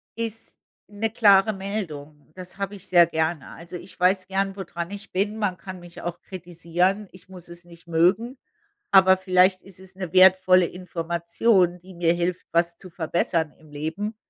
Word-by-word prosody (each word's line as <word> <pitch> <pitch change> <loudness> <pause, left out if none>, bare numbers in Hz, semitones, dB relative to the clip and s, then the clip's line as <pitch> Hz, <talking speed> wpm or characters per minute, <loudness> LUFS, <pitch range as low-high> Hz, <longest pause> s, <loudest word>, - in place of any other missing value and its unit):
ist 225 -1 -6 0.3
'ne 215 +2 -3
klare 205 -2 +5
Meldung. 160 -8 -6
Das 185 +1 -11
habe 200 0 -4
ich 195 -1 -11
sehr 175 -2 +6
gerne. 160 -2 -2
Also, 170 +2 -9
ich 185 - -14
weiß 185 +1 +2
gern, 195 0 -1
wo 195 - -5
dran 170 +1 -6
ich 205 0 -9
bin. 205 +3 -1
Man 190 -4 -1
kann 185 -1 -9
mich 175 0 -12
auch 175 0 -5
kritisieren. 180 +2 -2
Ich 185 0 -17
muss 180 -2 -12
es 170 0 -11
nicht 170 0 -17
mögen. 190 +10 +1 0.6
Aber 190 -1 +7
vielleicht 185 0 +3
ist 190 -1 -13
es 190 0 -14
'ne 185 -3 -6
wertvolle 185 -1 +6
Information, 175 +2 0
die 185 +1 -14
mir 170 -1 +1
hilft, 175 +1 -2
was 170 0 +1
zu 185 - -12
verbessern 165 -1 -1
im 155 -1 -19
Leben. 165 +9 -4
185 Hz, 175 wpm, -24 LUFS, 170-195 Hz, 0.6 s, Aber